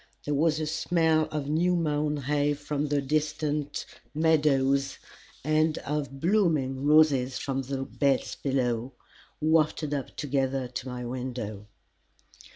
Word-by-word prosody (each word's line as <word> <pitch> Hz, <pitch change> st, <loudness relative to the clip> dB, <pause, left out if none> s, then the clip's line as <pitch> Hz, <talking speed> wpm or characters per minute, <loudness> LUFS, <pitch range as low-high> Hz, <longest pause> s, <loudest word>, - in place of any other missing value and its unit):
There 145 Hz, -, -1 dB
was 155 Hz, +2 st, +2 dB
a 155 Hz, -, -1 dB
smell 160 Hz, 0 st, +2 dB
of 150 Hz, -2 st, -3 dB
new 170 Hz, +4 st, +2 dB
mown 150 Hz, -2 st, 0 dB
hay 145 Hz, +1 st, 0 dB
from 145 Hz, 0 st, -3 dB
the 145 Hz, -1 st, 0 dB
distant 150 Hz, 0 st, -1 dB, 0.3 s
meadows, 140 Hz, -4 st, +2 dB, 0.5 s
and 155 Hz, +1 st, +2 dB
of 140 Hz, -2 st, -4 dB
blooming 155 Hz, -8 st, +1 dB
roses 140 Hz, -4 st, +4 dB
from 135 Hz, 0 st, -2 dB
the 135 Hz, 0 st, -3 dB
beds 140 Hz, -2 st, 0 dB
below, 125 Hz, -2 st, -1 dB, 0.5 s
wafted 155 Hz, -1 st, +2 dB
up 140 Hz, -2 st, -4 dB
together 135 Hz, -2 st, -1 dB
to 125 Hz, +1 st, -6 dB
my 125 Hz, -1 st, -5 dB
window. 120 Hz, -5 st, -5 dB
145 Hz, 125 wpm, -28 LUFS, 135-155 Hz, 0.5 s, roses